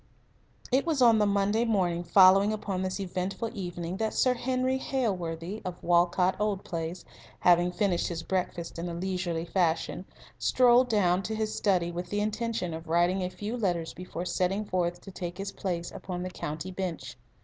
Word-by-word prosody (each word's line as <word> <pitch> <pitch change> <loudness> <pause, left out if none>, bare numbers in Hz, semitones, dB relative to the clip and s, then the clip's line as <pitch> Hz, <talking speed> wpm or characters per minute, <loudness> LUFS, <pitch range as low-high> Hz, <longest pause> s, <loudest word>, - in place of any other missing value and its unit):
It 265 +2 +3
was 325 -4 0
on 230 -3 +6
the 210 - +3
Monday 200 +3 +2
morning 180 -7 +1
following 195 +3 +6
upon 200 -3 -3
this 185 +1 -2
eventful 190 +4 -3
evening 175 -3 -4
that 220 0 -1
Sir 255 - +3
Henry 255 +1 0
Hailworthy, 190 -7 -2
of 180 -1 -6
Walcot 175 +1 +3
Old 210 -2 0
Place, 165 +1 -5 0.4
having 175 0 +5
finished 180 -1 0
his 165 -2 -4
breakfast 180 -3 -3
in 175 +1 -3
a 170 - -5
leisurely 175 -2 -2
fashion, 175 0 0 0.3
strolled 250 0 +4
down 185 -4 +3
to 220 +3 -3
his 215 0 -2
study 180 -4 +1
with 175 +1 -5
the 205 - -1
intention 215 -4 -2
of 160 +1 -7
writing 175 +3 +2
a 180 - -1
few 205 +5 -5
letters 175 -8 -1
before 180 -1 -6
setting 190 +3 0
forth 175 -2 -1
to 195 - -10
take 175 -1 -6
his 195 0 -4
place 175 -3 -3
upon 180 -1 -5
the 185 - -5
county 155 +2 -5
bench. 170 -9 -4
185 Hz, 175 wpm, -28 LUFS, 175-210 Hz, 0.4 s, on